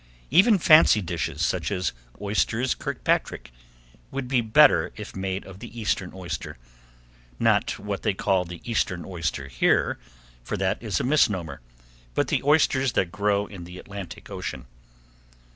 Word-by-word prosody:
Even 195 - +6
fancy 155 - +6
dishes, 80 -4 -2
such 90 +3 -1
as 90 -2 -1 0.3
Oysters 110 +5 0
Kirkpatrick, - - -2 0.6
would 135 -1 -4
be 125 -1 +2
better 110 -1 +5
if - - -9
made 95 0 -3
of 95 0 -11
the 120 +1 -9
eastern 90 -3 -1
oyster, 85 -7 -6 0.8
not - - +2
what 100 -1 -4
they 100 - 0
call 95 -2 +1
the 85 -1 -9
eastern 90 -7 -1
oyster 85 -7 -3
here, - - +1 0.4
for - - -3
that 95 0 -1
is 105 -7 -1
a - - -1
misnomer, 105 - +1 0.5
but - - +1
the - - +1
oysters 135 -3 +3
that 85 - 0
grow 100 0 +1
in 100 -4 -10
the 90 +1 -10
Atlantic 100 -2 -9
Ocean. - - -5
100 Hz, 145 wpm, -25 LUFS, 90-115 Hz, 0.8 s, Even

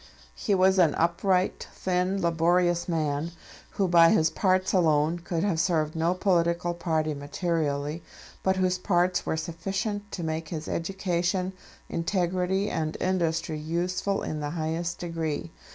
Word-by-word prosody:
He 195 - 0
was 190 0 +4
an 165 -4 +4
upright, 180 +3 +1
thin, 185 +1 0
laborious 175 +1 +2
man; 155 0 -1 0.4
who 195 -2 +1
by 170 -1 +7
his 160 -1 +3
parts 185 -1 +1
alone 160 -2 +3
could 170 0 -2
have 190 -6 +1
served 160 -3 +1
no 165 +2 +1
political 175 -2 +1
party 160 -3 -1
materially, 145 0 -2 0.4
but 190 0 +2
whose 185 -1 +1
parts 180 -1 +1
were 160 - 0
sufficient 195 +6 -3
to 175 - -4
make 160 0 -3
his 155 -2 -5
education, 185 +1 -1 0.3
integrity, 180 +2 0
and 155 -6 -2
industry 165 -4 0
useful 180 +5 -1
in 155 - -3
the 145 -1 -3
highest 165 +1 -2
degree. 165 -3 -3
170 Hz, 135 wpm, -27 LUFS, 160-185 Hz, 0.4 s, by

